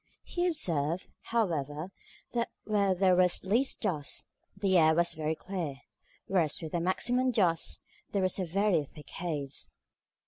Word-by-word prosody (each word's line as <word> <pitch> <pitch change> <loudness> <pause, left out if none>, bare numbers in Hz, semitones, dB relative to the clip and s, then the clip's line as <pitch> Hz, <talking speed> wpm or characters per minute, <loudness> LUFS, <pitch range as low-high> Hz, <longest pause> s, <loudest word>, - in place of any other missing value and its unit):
He 350 0 -1
observed, 170 - 0 0.2
however, 165 -7 -1 0.4
that 235 -1 0
where 200 -3 +2
there 185 0 +4
was 180 -1 +4
least 230 +8 +2
dust, 160 -9 -1 0.3
the 195 -1 +1
air 160 0 +5
was 170 +1 +4
very 155 0 -2
clear; 175 -6 -4 0.5
whereas 170 -6 +2
with 160 -3 -6
the 170 - -1
maximum 245 +8 +1
of 255 - +1
dust, 170 -6 +2 0.3
there 200 -2 0
was 185 +1 +3
a 185 - 0
very 185 -1 +2
thick 145 0 -13
haze. 145 -5 -3
180 Hz, 150 wpm, -30 LUFS, 160-200 Hz, 0.5 s, air